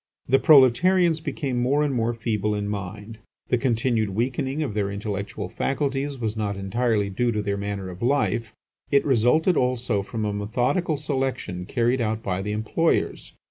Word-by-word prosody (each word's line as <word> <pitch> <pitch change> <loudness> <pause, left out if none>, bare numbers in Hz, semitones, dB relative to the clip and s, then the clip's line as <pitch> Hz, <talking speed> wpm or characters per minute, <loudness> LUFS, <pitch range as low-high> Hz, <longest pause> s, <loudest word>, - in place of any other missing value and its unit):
The 135 +2 +4
proletarians 160 +4 +5
became 140 -5 -3
more 140 +4 +2
and 145 -2 0
more 120 -1 0
feeble 105 -2 -1
in 105 0 -2
mind. 105 +2 -6 0.3
The 125 - +3
continued 115 -3 +1
weakening 130 +7 -1
of 130 - -3
their 100 -1 -1
intellectual 100 0 -4
faculties 140 0 -2
was 110 -3 -2
not 105 -2 -2
entirely 105 +1 0
due 120 +5 0
to 105 -2 -1
their 100 0 -1
manner 100 -1 -4
of 90 - -11
life; 120 -3 +1 0.4
it 140 -1 +3
resulted 140 - +3
also 125 -5 0
from 110 +2 -4
a 105 - -1
methodical 125 - 0
selection 130 - -3
carried 120 +1 +1
out 110 0 -1
by 95 -1 -2
the 105 +1 -3
employers. 110 +10 0
115 Hz, 165 wpm, -24 LUFS, 105-135 Hz, 0.4 s, proletarians